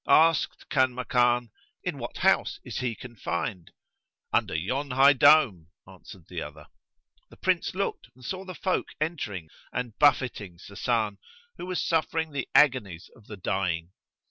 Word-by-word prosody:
Asked 165 Hz, -1 st, +3 dB
Kanmakan, 125 Hz, -2 st, +2 dB, 0.3 s
"In -, -, -3 dB
what -, -, -6 dB
house -, -, +2 dB
is -, -, -5 dB
he 125 Hz, -2 st, -2 dB
confined?" 100 Hz, -6 st, -5 dB, 0.6 s
"Under -, -, +1 dB
yon 130 Hz, -, -2 dB
high 135 Hz, +3 st, +6 dB
dome," 135 Hz, -, +5 dB, 0.2 s
answered 95 Hz, -1 st, -13 dB
the 90 Hz, -3 st, -5 dB
other. 75 Hz, 0 st, -9 dB, 0.6 s
The -, -, -16 dB
Prince 185 Hz, -2 st, 0 dB
looked 195 Hz, -9 st, -2 dB
and 125 Hz, -1 st, -15 dB
saw 185 Hz, +8 st, -4 dB
the 185 Hz, -1 st, -8 dB
folk 185 Hz, +2 st, -1 dB
entering 105 Hz, -, -3 dB, 0.2 s
and 125 Hz, -3 st, -4 dB
buffeting 120 Hz, -10 st, +2 dB
Sasan, 105 Hz, +2 st, -2 dB, 0.4 s
who 180 Hz, -, -7 dB
was 185 Hz, -1 st, -1 dB
suffering 160 Hz, -1 st, 0 dB
the 140 Hz, -3 st, -4 dB
agonies 105 Hz, -, +3 dB
of 110 Hz, -3 st, -20 dB
the 105 Hz, -, -8 dB
dying. 90 Hz, -2 st, -2 dB
120 Hz, 145 wpm, -27 LUFS, 95-145 Hz, 0.6 s, high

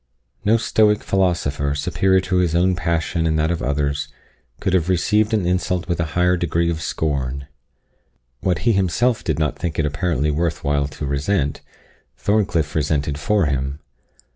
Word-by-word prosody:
No 110 Hz, +3 st, +4 dB
Stoic 105 Hz, -2 st, +2 dB
philosopher, 75 Hz, -7 st, 0 dB
superior 95 Hz, +6 st, +2 dB
to 95 Hz, 0 st, -1 dB
his 85 Hz, -2 st, +1 dB
own 90 Hz, +2 st, +3 dB
passion 85 Hz, -1 st, -1 dB
and 80 Hz, -1 st, +1 dB
that 80 Hz, +2 st, +1 dB
of 85 Hz, -, -2 dB
others, 70 Hz, +1 st, -1 dB, 0.5 s
could 95 Hz, -, -1 dB
have 90 Hz, -1 st, +2 dB
received 105 Hz, +4 st, +2 dB
an 105 Hz, -5 st, +1 dB
insult 90 Hz, 0 st, 0 dB
with 85 Hz, -2 st, -1 dB
a 85 Hz, -, +1 dB
higher 90 Hz, +1 st, +4 dB
degree 85 Hz, 0 st, 0 dB
of 80 Hz, -1 st, -4 dB
scorn. 70 Hz, -4 st, -2 dB, 0.9 s
What 90 Hz, -3 st, -1 dB
he 115 Hz, -, +5 dB
himself 110 Hz, +5 st, +1 dB
did 80 Hz, -4 st, -1 dB
not 75 Hz, -3 st, -1 dB
think 85 Hz, -2 st, -3 dB
it 80 Hz, -, +1 dB
apparently 75 Hz, 0 st, 0 dB
worth 80 Hz, +1 st, -1 dB
while 70 Hz, 0 st, +1 dB
to 70 Hz, -, -6 dB
resent, 70 Hz, +2 st, -1 dB, 0.6 s
Thorncliff 90 Hz, -, 0 dB
resented 75 Hz, -1 st, 0 dB
for 105 Hz, +3 st, +2 dB
him. 70 Hz, 0 st, -1 dB
85 Hz, 165 wpm, -21 LUFS, 75-95 Hz, 0.9 s, he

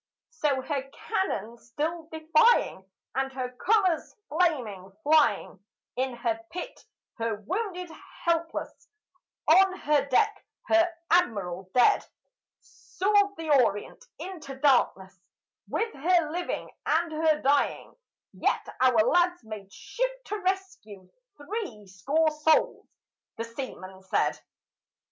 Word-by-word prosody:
So, 295 Hz, -4 st, 0 dB
her 275 Hz, -1 st, -3 dB
cannon 275 Hz, -, -3 dB
still 315 Hz, +8 st, -4 dB
defying, 320 Hz, -, +3 dB, 0.2 s
and 270 Hz, 0 st, -1 dB
her 255 Hz, -1 st, -4 dB
colors 370 Hz, -, +1 dB
flaming, 250 Hz, -, 0 dB
flying, 285 Hz, -10 st, +2 dB, 0.3 s
In 260 Hz, -1 st, -1 dB
her 235 Hz, -2 st, -1 dB
pit 360 Hz, +8 st, -8 dB, 0.3 s
her 230 Hz, -1 st, -1 dB
wounded 360 Hz, -, -4 dB, 0.3 s
helpless, 335 Hz, -1 st, -1 dB, 0.7 s
on 375 Hz, +3 st, +5 dB
her 295 Hz, -4 st, +2 dB
deck 260 Hz, -, +2 dB, 0.3 s
her 335 Hz, +1 st, +5 dB, 0.2 s
Admiral 195 Hz, -, +1 dB
dead, 250 Hz, -, +5 dB, 0.6 s
Soared 405 Hz, +1 st, 0 dB
the 320 Hz, -2 st, -3 dB
Orient 205 Hz, -2 st, -3 dB
into 315 Hz, -5 st, -7 dB
darkness 245 Hz, -9 st, +2 dB, 0.5 s
with 450 Hz, 0 st, -1 dB
her 335 Hz, +1 st, +2 dB
living 350 Hz, +1 st, -3 dB, 0.2 s
and 325 Hz, +2 st, +2 dB
her 310 Hz, -1 st, +2 dB
dying: 280 Hz, +2 st, +1 dB, 0.4 s
"Yet -, -, -1 dB
our 255 Hz, -2 st, +4 dB
lads 350 Hz, +3 st, +2 dB
made 210 Hz, -3 st, -9 dB
shift -, -, -4 dB
to 425 Hz, -, -4 dB
rescue 370 Hz, -, -4 dB, 0.3 s
three 295 Hz, -, -6 dB
score 275 Hz, +13 st, +1 dB
souls," 305 Hz, +1 st, +2 dB, 0.5 s
the 225 Hz, -, -2 dB
seaman 230 Hz, -6 st, -8 dB
said. 190 Hz, -, 0 dB
300 Hz, 110 wpm, -27 LUFS, 230-355 Hz, 0.7 s, on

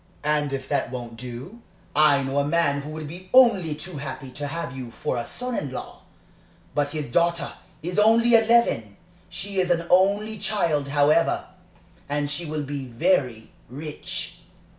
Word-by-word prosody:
And 150 Hz, -1 st, +1 dB
if 135 Hz, -1 st, -4 dB
that 140 Hz, -4 st, 0 dB
won't 120 Hz, -2 st, -6 dB
do 125 Hz, -, -8 dB, 0.3 s
"I 145 Hz, -2 st, +5 dB
know 135 Hz, +1 st, 0 dB
a -, -, +2 dB
man 145 Hz, -2 st, +1 dB
who 145 Hz, -, -8 dB
would 155 Hz, -1 st, -6 dB
be 180 Hz, +4 st, -10 dB
only 200 Hz, -12 st, +6 dB
too 175 Hz, +2 st, -7 dB
happy 140 Hz, -1 st, -6 dB
to 145 Hz, +3 st, -4 dB
have 165 Hz, -2 st, -4 dB
you 130 Hz, -2 st, -6 dB
for 115 Hz, -, -3 dB
a 120 Hz, -1 st, -3 dB
son 250 Hz, -1 st, -1 dB
in 145 Hz, -, -2 dB
law; 130 Hz, -, -7 dB, 0.7 s
but 145 Hz, -1 st, +1 dB
his 150 Hz, -4 st, -4 dB
daughter 170 Hz, 0 st, +1 dB, 0.3 s
is 180 Hz, +4 st, -1 dB
only 230 Hz, +3 st, +5 dB
eleven; 225 Hz, -, +3 dB, 0.3 s
she 190 Hz, +2 st, -3 dB
is 180 Hz, -1 st, +1 dB
an 170 Hz, -1 st, +1 dB
only 200 Hz, +4 st, +3 dB
child, 170 Hz, -8 st, +1 dB
however, 145 Hz, +3 st, +3 dB, 0.6 s
and 145 Hz, 0 st, -1 dB
she 165 Hz, +3 st, -2 dB
will 155 Hz, 0 st, -3 dB
be 140 Hz, -1 st, -5 dB
very 125 Hz, -4 st, 0 dB, 0.2 s
rich. 150 Hz, +4 st, -5 dB
150 Hz, 165 wpm, -25 LUFS, 140-180 Hz, 0.7 s, only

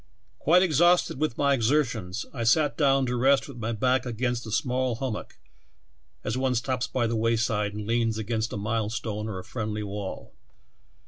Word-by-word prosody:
"Quite 180 Hz, +4 st, +5 dB
exhausted 175 Hz, -2 st, +3 dB
with 155 Hz, -6 st, -1 dB
my 140 Hz, -1 st, +3 dB
exertions, 120 Hz, -6 st, 0 dB
I 120 Hz, -4 st, -3 dB
sat 145 Hz, +6 st, +3 dB
down 135 Hz, -3 st, +3 dB
to 125 Hz, 0 st, -1 dB
rest 135 Hz, +3 st, +3 dB
with 135 Hz, -3 st, -10 dB
my 115 Hz, 0 st, -3 dB
back 125 Hz, +3 st, +1 dB
against 120 Hz, -1 st, -2 dB
a -, -, -6 dB
small 125 Hz, +1 st, 0 dB
hum 130 Hz, 0 st, -2 dB
mock, -, -, -8 dB, 0.9 s
as 110 Hz, -, -2 dB
one 130 Hz, 0 st, 0 dB
stops 125 Hz, +1 st, -1 dB
by 125 Hz, -2 st, 0 dB
the 115 Hz, 0 st, -1 dB
wayside 110 Hz, -2 st, 0 dB
and 105 Hz, 0 st, -5 dB
leans 115 Hz, 0 st, +1 dB
against 110 Hz, +1 st, -2 dB
a -, -, -4 dB
milestone 110 Hz, 0 st, -2 dB
or 105 Hz, -4 st, -4 dB
a 90 Hz, -, -6 dB
friendly 105 Hz, -1 st, -4 dB
wall. 100 Hz, -1 st, -6 dB
120 Hz, 180 wpm, -26 LUFS, 110-130 Hz, 0.9 s, Quite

